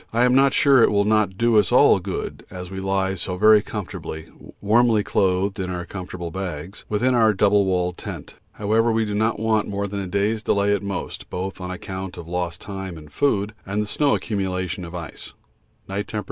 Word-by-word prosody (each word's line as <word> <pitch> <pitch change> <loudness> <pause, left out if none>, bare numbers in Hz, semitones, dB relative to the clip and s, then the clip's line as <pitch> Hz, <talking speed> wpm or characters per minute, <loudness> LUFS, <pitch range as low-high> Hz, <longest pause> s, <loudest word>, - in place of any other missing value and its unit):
I 115 +2 +2
am 125 - +3
not 135 +1 +5
sure 140 -4 +5
it - - +6
will 100 -1 +2
not 105 -3 +2
do 115 -1 +4
us 95 -4 +1
all - - +6
good - - -5
as 90 -1 -8
we 95 - -5
lie 95 0 0
so 90 0 -3
very 110 +2 +6
comfortably, 90 -6 -6 0.3
warmly 110 +1 +3
clothed 95 -1 +1
in 95 -1 -2
our 90 -1 -4
comfortable 90 -3 -6
bags, 90 -1 -6
within 120 +5 +1
our 110 -3 +4
double 100 +1 +4
walled 90 -1 -1
tent. - - -7 0.2
However, 110 +3 +1
we 110 0 +1
do 105 - -3
not 110 +2 0
want 110 -1 +1
more 100 0 -2
than 100 0 -4
a 95 - -4
day's 100 +4 0
delay 100 -1 +2
at 100 - 0
most, 100 -2 -5
both 95 +1 -5
on 90 - -5
account 95 0 -6
of 85 - -8
lost 90 -1 -3
time 95 -3 -6
and 75 -1 -13
food 105 -7 +1
and 100 +2 -3
the 105 - 0
snow 140 +7 +2
accumulation 95 -3 -3
of 85 +1 -9
ice. 85 -2 -8 0.5
(Night 100 +2 -3
T. 110 - -5
100 Hz, 205 wpm, -23 LUFS, 90-110 Hz, 0.5 s, it